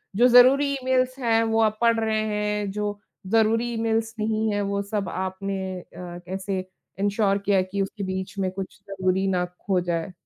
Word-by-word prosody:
जो 240 +4 +6
ज़रूरी 255 +3 +7
ईमेल्स 255 -1 0
हैं 230 -2 +3
वो 225 0 +2
आप 215 -1 +2
पढ़ 230 -1 +4
रहे 220 -1 0
हैं, 210 -1 -1
जो 205 0 -3 0.3
ज़रूरी 225 +1 +3
ईमेल्स 225 0 0
नहीं 220 0 0
है 205 - 0
वो 200 0 -1
सब 205 -3 -1
आपने 190 0 -3
अ, - - -12
कैसे 185 +2 -5 0.4
इंश्योर 200 0 +2
किया 200 -1 +3
है 185 - +3
कि 190 +2 -3
उसके 195 +1 -4
बीच 190 +1 -4
में 190 -1 0
कुछ 190 0 -7
ज़रूरी 190 0 0
ना 180 -2 +1 0.2
खो 190 -3 +2
जाए। 170 0 -2
205 Hz, 180 wpm, -25 LUFS, 190-225 Hz, 0.4 s, ज़रूरी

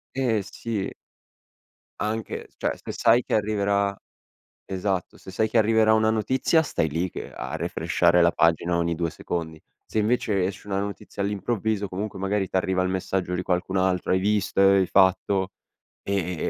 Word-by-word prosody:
Eh, 120 -6 +1
sì. 100 +1 -4 1.1
Anche 110 +1 -3
s - - -34
cioè - - -1
se - - -8
sai 120 +2 +3
che - - -4
arriverà 100 -1 +1 0.7
esatto, 95 -1 -2
se 95 - -11
sai 110 +3 0
che 115 - +1
arriverà 110 0 +4
una 110 0 +3
notizia 130 - +2
stai 115 - -1
lì 85 +5 -1
che - - -8
a 65 +6 -5
refreshare 85 +1 +2
la 85 0 +5
pagina 85 +1 +2
ogni 85 0 0
2 85 0 -1
secondi. 80 -1 -5 0.2
Se - - -6
invece 105 -3 +1
esce 100 +2 -6
una 95 -1 -1
notizia 100 0 -5
all'improvviso 105 +1 -1
comunque 95 +1 -5
magari 95 0 0
t'arriva 95 0 0
il 95 - 0
messaggio 95 -1 -2
di 90 - -1
qualcun 95 +1 -1
altro: 95 -1 +1
"Hai 95 - +3
visto 100 -1 +1
hai 95 -1 +5
fatto" 95 0 +3 0.5
e 100 - -2
e 90 -2 -1
95 Hz, 165 wpm, -25 LUFS, 90-105 Hz, 1.1 s, la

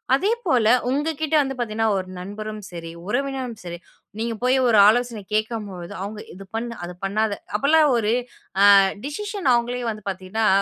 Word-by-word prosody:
அதே 395 +11 +1
போல 245 -10 +3 0.2
உங்கக்கிட்ட 310 +2 -1
வந்து 270 -1 -2
பார்த்தீங்கன்னா, 225 -1 0
ஒரு 185 -1 -4
நண்பரும் 210 +3 -6
சரி, 165 -1 -7 0.2
உறவினரும் 260 0 -2
சரி, 175 -1 -7 0.4
நீங்கப் 230 -1 -3
போயி 255 +1 +3
ஒரு 220 -3 +5
ஆலோசனை 235 -1 +2
கேட்கும்பொழுது 215 -5 -3
அவுங்க 210 +1 -6
இது 195 0 -11
பண்ணு! 235 +1 -4
அதப் 180 0 -10
பண்ணாத! 210 +1 0 0.2
அப்பிடிலாம் 300 +3 +4
ஒரு 215 -2 +1 0.7
ஆ - - +9 0.3
டிஸிஷன் 395 +2 -3
அவங்களே 240 +1 -1
வந்து 215 -2 -8
பார்த்தீங்கன்னா 190 +4 -2
225 Hz, 155 wpm, -23 LUFS, 205-265 Hz, 0.7 s, ஆ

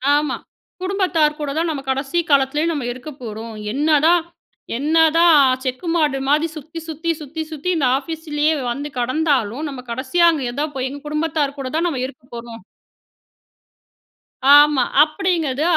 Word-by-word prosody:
ஆமா. 295 -2 0 0.4
குடும்பத்தார் 365 -6 +1
கூட 295 -2 -3
தான் 330 +1 0
நம்ம 290 -4 -3
கடைசி 270 +5 -1
காலத்துலேயும் 285 +3 +2
நம்ம 285 -5 -3
இருக்க 255 +4 -9
போறோம். 225 0 -7 0.2
என்னதான் 310 +4 +3 0.5
என்னதான் 320 +2 +5 0.2
செக்கு 260 +6 -4
மாடு 300 -5 +1
மாதிரி 300 +3 +3
சுத்தி, 315 +3 -8
சுத்தி, 325 +2 -2
சுத்தி, 305 +2 -6
சுத்தி 310 +3 -4
இந்த 280 -6 +2
ஆஃபீஸிலேயே 310 +1 -1 0.2
வந்து 285 +4 -4
கெடந்தாலும், 260 0 0
நம்ம 270 -3 -7
கடைசியா 260 +8 +1
அங்க 295 -5 -3
ஏதா 285 +5 -2
போய் 260 0 -2
எங்க 285 +2 -8
குடும்பத்தார் 300 -2 -1
கூட 265 -1 -4
தான் 335 +2 +1
நம்ம 275 -7 -2
இருக்க 260 -1 -10
போறோம். 235 -2 -9 2.0
ஆமா. 295 -3 +5 0.2
அப்படீங்கறது 310 -4 -1
295 Hz, 140 wpm, -20 LUFS, 270-320 Hz, 2.0 s, என்னதான்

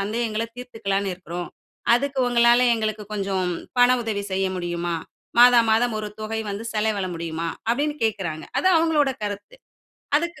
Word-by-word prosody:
சந்தேகங்கள்ல 220 +2 -1
தீர்த்துக்கலாம்னு 200 -6 -2
இருக்குறோம். 175 -1 -6 0.5
அதுக்கு 275 +2 -1
உங்களால 240 +1 +5
எங்களுக்கு 215 -1 -2
கொஞ்சம் 195 -3 -1 0.3
பண 245 - +7
உதவி 215 -3 -2
செய்ய 190 0 +1
முடியுமா? 175 -1 -2 0.4
மாதா 245 0 +8
மாதம் 225 +1 +2
ஒரு 210 - -4
தொகை 220 +1 -3
வந்து 200 +3 -5
செலவிட 210 -3 0
முடியுமா?" 165 0 -4 0.2
அப்டீன்னு 290 +5 0
கேட்கிறாங்க. 190 -8 -2
அது 280 - 0
அவங்களோட 320 -4 +3
கருத்து. 205 - -5 0.6
அதுக்கு 340 -1 -5
215 Hz, 140 wpm, -23 LUFS, 195-245 Hz, 0.6 s, மாதா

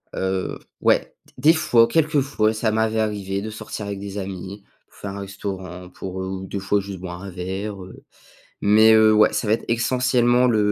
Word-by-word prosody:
heu, 95 0 -2 0.2
ouais. - - +2 0.2
D 150 +5 +5
des - - +3
fois 120 -8 +4
quelques 155 +2 +2
fois, 110 -6 +1
ça 110 0 0
m'avait 110 0 0
arrivé 100 -2 -2
de 110 - -5
sortir 105 -1 -7
avec 100 -1 -5
des 100 0 -7
amis, 95 +1 -6 0.3
faire 100 - -8
un 100 0 -6
restaurant 95 -2 -7
pour 95 +1 -7
heu, 95 0 -5
des 100 - -4
fois 100 +1 0
juste 100 -2 -8
boire 90 -1 -7
un 100 - -6
verre, 95 +3 -5
heu, 95 - -13 0.6
mais 110 +2 +6
heu, 110 0 +6
ouais, 105 0 +5
ça 110 - -2
va 105 - +2
être 115 - 0
essentiellement 125 +1 +2
le, 110 -2 +2
100 Hz, 195 wpm, -22 LUFS, 95-110 Hz, 0.6 s, mais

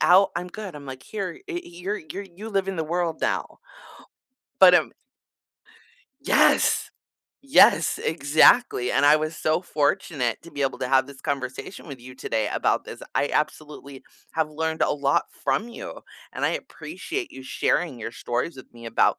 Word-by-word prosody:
out, 180 +5 +6
I'm 175 +1 -3
good. 195 -1 -8
I'm 140 -1 -10
like, 130 -1 -8
"Here, 200 - -5
it 350 -2 -5
you're 180 +5 -4
you're 195 - -5
you 195 +4 -10
live 195 -3 -1
in 195 - -3
the 160 - -1
world 170 0 -2
now." - - -2 1.0
But, 185 -1 +9
um 165 -3 +3 1.3
Yes! - - +3 0.5
Yes, 275 +1 +5
exactly, 155 - +4
and 145 - +3
I 150 +1 +7
was 155 +1 -3
so 155 +3 0
fortunate 145 - -1
to 170 - -13
be 145 - -7
able 135 -1 0
to 125 - -2
have 130 0 +4
this 140 -1 -13
conversation 140 +5 -4
with 140 -4 -8
you 130 +1 -11
today 110 -4 -2
about - - +1
this. - - -9
I 145 - +1
absolutely 150 -3 -3 0.3
have 160 -1 0
learned 160 +1 -2
a - - +3
lot 140 -1 +1 0.2
from 140 - 0
you, 235 - -9 0.3
and - - -2
I - - +3
appreciate 390 -3 -5
you 130 - -10
sharing 135 +2 0
your 115 0 -6
stories 125 +7 -3
with 130 - -13
me 115 0 -12
about 115 - +2
155 Hz, 170 wpm, -24 LUFS, 135-180 Hz, 1.3 s, But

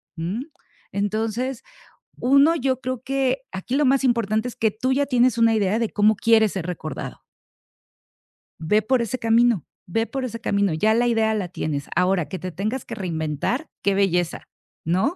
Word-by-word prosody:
¿mm? 175 +9 -3 0.5
Entonces, 220 +5 -2 0.5
uno, 280 +6 +4
yo 260 -4 0
creo 255 -1 -3
que 270 -1 0
aquí 190 +7 -4
lo 295 - +3
más 270 +1 +3
importante 230 -2 +1
es 245 - -7
que 220 -1 +1
tú 255 +5 -1
ya 280 +1 +1
tienes 250 -2 +3
una 230 -1 +4
idea 205 0 +1
de 230 -2 0
cómo 215 +1 +3
quieres 220 0 +3
ser 180 -3 -4
recordado. 160 -3 -6 1.4
Ve 190 +7 +2
por 250 +3 +1
ese 235 +2 -2
camino 230 - +3 0.3
ve 225 +4 +1
por 270 +2 -4
ese 230 -2 -4
camino, 200 -3 +1
ya 210 +8 +2
la 240 +2 +2
idea 225 -2 +2
la 205 -4 -2
tienes, 150 -5 -4
ahora, 180 -3 +1
¿qué 190 - -4
te 185 0 -6
tengas 215 +9 -3
que - - -7
reinventar? 175 - -2
Qué 200 -1 +1
belleza, 180 -4 0 0.4
¿no? 185 - +1
220 Hz, 175 wpm, -23 LUFS, 190-250 Hz, 1.4 s, uno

